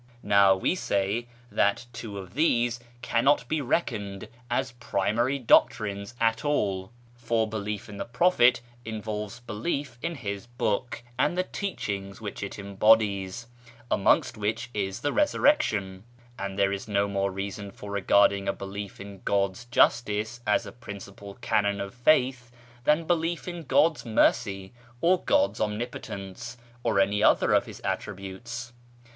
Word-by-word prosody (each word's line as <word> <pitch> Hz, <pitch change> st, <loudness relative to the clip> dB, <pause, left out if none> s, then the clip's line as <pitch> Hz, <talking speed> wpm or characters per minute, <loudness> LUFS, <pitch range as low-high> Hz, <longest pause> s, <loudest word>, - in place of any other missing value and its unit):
Now 100 Hz, -1 st, +5 dB
we 95 Hz, -, +1 dB
say 105 Hz, -, -1 dB, 0.2 s
that 100 Hz, +4 st, +2 dB
two 105 Hz, -4 st, -7 dB
of 95 Hz, -2 st, -8 dB
these 120 Hz, -5 st, +2 dB, 0.2 s
cannot 125 Hz, +1 st, +2 dB
be 155 Hz, +2 st, 0 dB
reckoned 105 Hz, -, -2 dB, 0.2 s
as 130 Hz, +2 st, 0 dB
primary 120 Hz, +2 st, 0 dB
doctrines 110 Hz, -3 st, +2 dB
at 115 Hz, +3 st, +1 dB
all; 100 Hz, -10 st, 0 dB, 0.2 s
for 115 Hz, -2 st, 0 dB
belief 105 Hz, -1 st, -4 dB
in 105 Hz, -2 st, -9 dB
the -, -, -3 dB
Prophet 125 Hz, -2 st, +4 dB, 0.2 s
involves 110 Hz, 0 st, -5 dB
belief 120 Hz, +2 st, -3 dB
in 170 Hz, 0 st, -2 dB
his 100 Hz, -4 st, -5 dB
book 120 Hz, 0 st, -2 dB, 0.2 s
and 150 Hz, +6 st, +2 dB
the 185 Hz, -, +2 dB
teachings 100 Hz, -, -4 dB
which 105 Hz, -3 st, -6 dB
it 100 Hz, -, -5 dB
embodies, 100 Hz, 0 st, +2 dB, 0.5 s
amongst 100 Hz, -, +3 dB
which 110 Hz, +4 st, -2 dB
is 95 Hz, -2 st, -2 dB
the 145 Hz, -, 0 dB
Resurrection; 105 Hz, -, +2 dB, 0.4 s
and 100 Hz, 0 st, -4 dB
there 100 Hz, -1 st, +3 dB
is 100 Hz, +2 st, -5 dB
no 100 Hz, -1 st, +1 dB
more 100 Hz, 0 st, 0 dB
reason 100 Hz, +1 st, -5 dB
for 100 Hz, +1 st, -9 dB
regarding 100 Hz, 0 st, +3 dB
a 100 Hz, -, +1 dB
belief 100 Hz, 0 st, -7 dB
in 100 Hz, -1 st, -9 dB
God's 100 Hz, +3 st, 0 dB
justice 120 Hz, -1 st, +2 dB
as 105 Hz, -, +2 dB
a -, -, -8 dB
principal 100 Hz, -3 st, -10 dB
canon 100 Hz, -2 st, +1 dB
of 100 Hz, 0 st, -5 dB
faith 125 Hz, -1 st, +2 dB, 0.4 s
than 150 Hz, +2 st, +3 dB
belief 170 Hz, +1 st, 0 dB
in 175 Hz, -2 st, -6 dB
God's 155 Hz, +3 st, +3 dB
Mercy, 100 Hz, -3 st, +1 dB, 0.3 s
or 180 Hz, +4 st, +3 dB
God's 290 Hz, 0 st, +2 dB
Omnipotence, 105 Hz, 0 st, -4 dB, 0.2 s
or 110 Hz, -4 st, +1 dB
any 100 Hz, +2 st, +2 dB
other -, -, +4 dB
of -, -, +3 dB
His -, -, -10 dB
Attributes. 115 Hz, +5 st, -5 dB
110 Hz, 140 wpm, -27 LUFS, 100-120 Hz, 0.5 s, Now